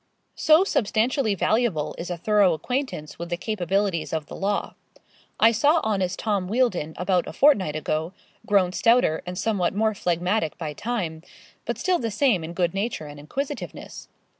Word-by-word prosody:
So 315 +3 +5
substantially 230 - +1
valuable 210 -6 0
is 175 - -5
a 175 - -3
thorough 200 0 +3
acquaintance 205 - -4
with 170 0 -5
the 175 - -2
capabilities 195 -3 -1
of 160 -2 -2
the - - -9
law. 200 +1 -2 0.7
I 225 - +6
saw 290 +8 +3
honest 195 -4 -1
Tom 200 -4 -1
Wealdon 195 -9 0
about 180 0 +1
a - - -6
fortnight 195 - +3
ago 155 +2 -2 0.4
grown 190 -3 +3
stouter 230 -8 +3
and 180 0 -5
somewhat 195 -4 0
more 220 +1 +2
phlegmatic 180 -1 -1
by 155 -3 -4
time, 185 -5 -3 0.4
but - - -2
still 370 -2 +1
the 230 - -2
same 220 - +2
in 165 +2 -6
good 175 -1 0
nature 200 -4 -3
and 145 0 -10
inquisitiveness. 265 - -6
195 Hz, 165 wpm, -24 LUFS, 170-225 Hz, 0.7 s, I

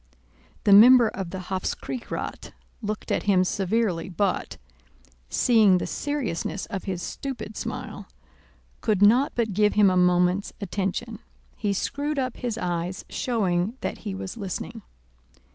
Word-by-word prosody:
The 200 - +5
member 235 +2 +8
of 190 -3 -5
the 190 - -6
Hofkriegsrath 210 +6 -4 0.3
looked 215 -1 -4
at - - +1
him 185 -2 +5
severely 190 -2 0
but, 190 +1 -1 0.7
seeing 215 - +4
the - - -2
seriousness 265 - -3
of 195 - -6
his 185 -3 -3
stupid 260 -6 -6
smile, - - -6 0.7
could 210 -3 +2
not 245 +7 +5
but 225 -4 0
give 210 +2 +3
him 205 -2 +5
a - - +1
moment's 180 +2 +2
attention. 200 +3 -3 0.4
He 205 -3 -1
screwed 285 +9 -2
up 255 -2 -2
his 240 -3 -3
eyes 175 -2 -3
showing 205 -2 -1
that - - -4
he 205 -3 -5
was 190 +3 -6
listening. 195 -5 -5
205 Hz, 135 wpm, -25 LUFS, 185-230 Hz, 0.7 s, member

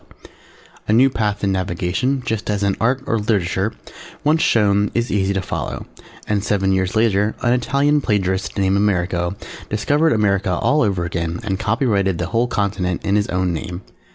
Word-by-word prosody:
A 105 - +2
new 130 +4 +5
path 105 -3 -2
in 100 - +2
Navigation, 95 +8 -1
just 110 -3 -3
as 105 -1 0
in 100 -1 +1
Art 130 +3 +1
or 115 - 0
Literature, 100 -1 0 0.5
once 155 +2 +3
shown, 105 -2 +3
is 120 +1 0
easy 100 -1 +1
to 95 -1 -1
follow, - - -4 0.4
and 105 -2 0
seven 95 -2 +1
years 95 +1 0
later 110 -1 +2
an 120 -1 +3
Italian 140 +4 +2
plagiarist 95 -4 -1
named 95 0 +2
Amerigo 90 -3 0 0.3
discovered 145 +10 +2
America 100 -3 +1
all 150 +11 +2
over 95 -5 0
again 85 -1 -3
and 95 -3 -2
copyrighted 105 -4 +1
the 85 - -2
whole 115 +2 +2
continent 95 -5 -2
in 100 - +1
his 105 -1 +1
own 90 -1 0
name. 90 +2 -5
100 Hz, 170 wpm, -20 LUFS, 95-115 Hz, 0.5 s, new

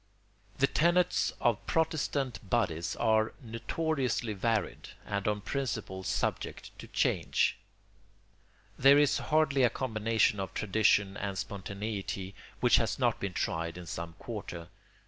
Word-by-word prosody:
] - - -32
The 140 - +4
tenets 175 +5 +2
of 120 -4 +1
Protestant 145 -5 0
bodies 85 -8 0
are 110 -1 +2
notoriously 125 0 -2
varied 110 0 -1 0.2
and 100 0 -2
on 105 -1 0
principle 110 -6 -3
subject - - -3
to - - -9
change. - - +1 1.2
There 135 +2 +7
is 145 -1 +4
hardly 150 -3 +2
a 125 - +5
combination 110 -3 +1
of 95 - -5
tradition 105 -1 +2
and 100 -2 -3
spontaneity 100 0 -4 0.3
which - - +6
has - - 0
not - - +1
been 100 -2 -3
tried 85 0 -2
in 90 - -8
some 85 0 -5
quarter. 85 +1 -7
110 Hz, 125 wpm, -31 LUFS, 95-130 Hz, 1.2 s, There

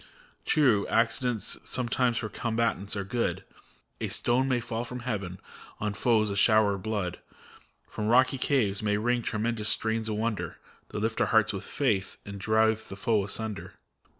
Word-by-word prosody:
True, 125 -10 +3
accidents 115 0 0
sometimes 125 -1 0
for 110 - -2
combatants 115 -4 -1
are 100 - -2
good; 115 +5 -1 0.6
A - - -1
stone 125 +2 +1
may 130 -2 +2
fall 120 0 -3
from 125 0 -6
heaven, 100 -6 -3 0.4
on 105 -1 -1
foes 110 0 +2
a - - -2
shower 110 0 +4
of 100 - -5
blood; 100 -5 -2 0.7
From 105 - -4
rocky 130 +3 +4
caves 110 -9 +1
may 105 -1 +1
ring 120 +3 +1
tremendous 110 -1 -1
strains 110 0 -1
of 105 - -1
wonder. 110 0 -2 0.3
That 105 - -5
lift 110 +1 0
our - - +3
hearts 110 -2 +3
with 100 0 -5
faith, 105 -9 0
and 100 0 -7
drive 110 +1 +2
the - - -6
foe 110 0 +2
asunder. 105 +1 -5
110 Hz, 165 wpm, -28 LUFS, 105-120 Hz, 0.7 s, shower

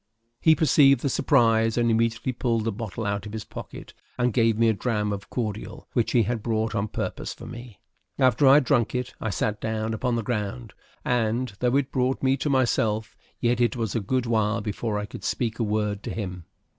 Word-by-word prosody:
He 160 -1 +5
perceived 140 -4 +5
the 140 - 0
surprise, 115 -1 +3
and 120 -1 +3
immediately 115 +3 +1
pulled 115 -2 -1
a - - +1
bottle 110 0 -5
out 100 0 -2
of 105 - -9
his 110 -1 -4
pocket - - -9 0.2
and 125 -1 +1
gave 115 -3 +3
me 115 0 +4
a 110 - +4
dram 105 -1 -1
of 100 -1 -7
cordial, 110 -3 -4
which 120 - +1
he 120 - +5
had 115 +1 -2
brought 110 0 -1
on 105 -1 -1
purpose - - -4
for - - -11
me. 120 -3 -10 0.4
After 130 +1 +4
I 135 - +8
had 150 - +5
drunk 125 -4 +1
it, 125 0 -3
I 110 - -1
sat 105 +1 -2
down 110 0 -2
upon 120 +2 -1
the 115 - -1
ground; 105 - -3 0.3
and, 120 0 0
though 125 +1 +1
it 140 -2 -1
brought 130 0 0
me 135 0 +3
to 145 - -2
myself, 115 -4 +1 0.2
yet 120 0 +1
it 120 -1 +2
was 115 -4 -2
a 115 - +1
good 125 +5 -1
while 110 -1 +1
before 105 +1 -3
I 105 - -2
could - - -10
speak 115 -2 -2
a - - +1
word 105 -1 -1
to - - -6
him. 90 -5 -5
115 Hz, 215 wpm, -25 LUFS, 110-125 Hz, 0.4 s, I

